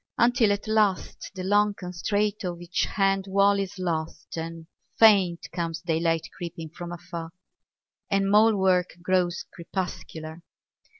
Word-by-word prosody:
Until 235 -3 +4
at 205 +1 -2
last 215 -3 0
the 185 - -5
long 205 +2 +3
constraint 205 +3 -2
Of 175 -2 -3
each 175 0 -1
hand 195 -1 +1
wall 200 +1 +3
is 195 0 -4
lost, 165 -3 -3
and 165 0 -6 0.3
faint 195 -6 +5
Comes 170 -1 -3
daylight 165 -1 0
creeping 170 -2 -6
from 175 +2 -8
afar; 170 -1 -7 0.8
And 195 0 +2
mole 215 +1 +6
work 185 -2 +2
grows 180 -1 +1
crepuscular. 170 -2 -6
185 Hz, 130 wpm, -26 LUFS, 170-200 Hz, 0.8 s, mole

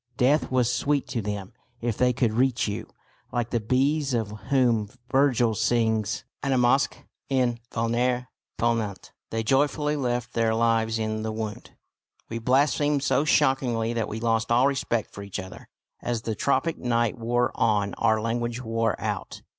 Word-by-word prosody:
Death 140 +5 +3
was 125 -2 +2
sweet 140 +3 0
to 120 - -2
them 100 -2 -5 0.3
if 115 -2 -1
they 125 +2 +3
could 115 -2 +1
reach 125 0 +2
you. 100 - -4 0.4
Like 120 -1 -2
the 120 - +1
bees 135 +4 +1
of 110 -3 -1 0.2
whom 120 -6 +2 0.2
Virgil 130 -4 +3
sings, 110 -1 +1 0.2
"Animasque 130 -1 +2 0.2
in 125 -3 +1
vulnere 125 +2 0 0.3
ponunt," 115 -4 -1 0.2
they 115 0 -2
joyfully 145 +4 +2
left 125 -3 -2
their 115 -1 +1
lives 115 -1 +2
in 110 -1 -2
the 110 0 -2
wound. 110 -1 -6 0.5
We 115 - -3
blasphemed 140 +3 +2
so 140 +1 +2
shockingly 130 -6 +2
that 115 -2 -1
we 110 - -5
lost 115 0 0
all 120 +3 +5
respect 130 -5 0
for 100 - -8
each 100 -1 -5
other. 95 0 -9 0.3
As 120 -2 -2
the 110 - -2
tropic 140 +9 0
night 120 -1 0
wore 120 +2 +1
on 105 -3 +1
our 110 -1 +3
language 120 +1 -2
wore 115 -2 -1
out. - - -4
120 Hz, 155 wpm, -26 LUFS, 110-130 Hz, 0.5 s, all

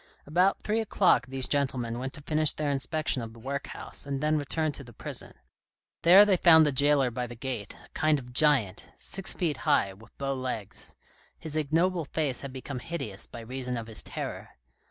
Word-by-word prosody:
About 180 +6 +2
three 215 +1 0
o'clock 195 - +3
these 130 0 -2
gentlemen 125 -5 -1
went 130 +1 -4
to 150 - -5
finish 155 0 +3
their 150 -2 -1
inspection 140 0 -1
of 115 -1 -7
the 115 - -14
workhouse 140 +4 -5
and 140 -1 -3
then 155 +2 +1
returned 155 +2 -1
to 140 - -7
the 120 -2 -13
prison. - - -6 0.7
There 185 +5 +8
they 195 -3 +3
found 160 -2 +7
the 150 - +2
jailer 140 -1 +3
by 125 +1 -3
the 120 - -9
gate, 120 -4 -5
a - - -22
kind 155 -1 +2
of 125 -3 -10
giant, 130 -9 +3
six 195 -1 -1
feet 165 -5 -1
high, 95 - +2
with 110 +4 -18
bow 135 0 -2
legs. 125 -6 -4 0.4
His 160 -2 -5
ignoble 165 +3 +1
face 140 -3 -2
had 140 - -6
become 130 0 -6
hideous 115 -10 -5
by 120 - -9
reason 125 +1 -4
of 115 - -5
his 110 -1 -4
terror. - - -6
140 Hz, 195 wpm, -28 LUFS, 125-155 Hz, 0.7 s, There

